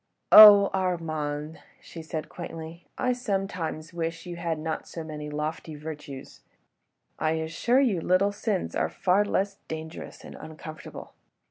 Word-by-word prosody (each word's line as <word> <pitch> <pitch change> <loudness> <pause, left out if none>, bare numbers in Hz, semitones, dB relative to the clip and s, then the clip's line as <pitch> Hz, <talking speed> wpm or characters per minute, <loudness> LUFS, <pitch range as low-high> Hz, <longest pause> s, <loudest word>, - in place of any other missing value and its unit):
"Oh! 205 -2 +10
Armand!" 160 -4 -2 0.2
she 165 - -10
said 160 -1 -5
quaintly, 165 -1 -9
"I 250 0 +1
sometimes 195 -9 -3
wish 165 0 -4
you 175 -1 -6
had 170 -2 -2
not 160 0 -4
so 165 - -7
many 150 -1 -7
lofty 150 +1 -4
virtues.... 150 -3 -9 0.8
I 155 0 +1
assure 165 +11 +1
you 210 -11 +1
little 185 +4 +2
sins 205 -2 -2
are - - 0
far 190 +2 +2
less 200 -1 -1
dangerous 160 0 -8
and - - -10
uncomfortable. 155 0 -10
165 Hz, 135 wpm, -27 LUFS, 155-195 Hz, 0.8 s, Oh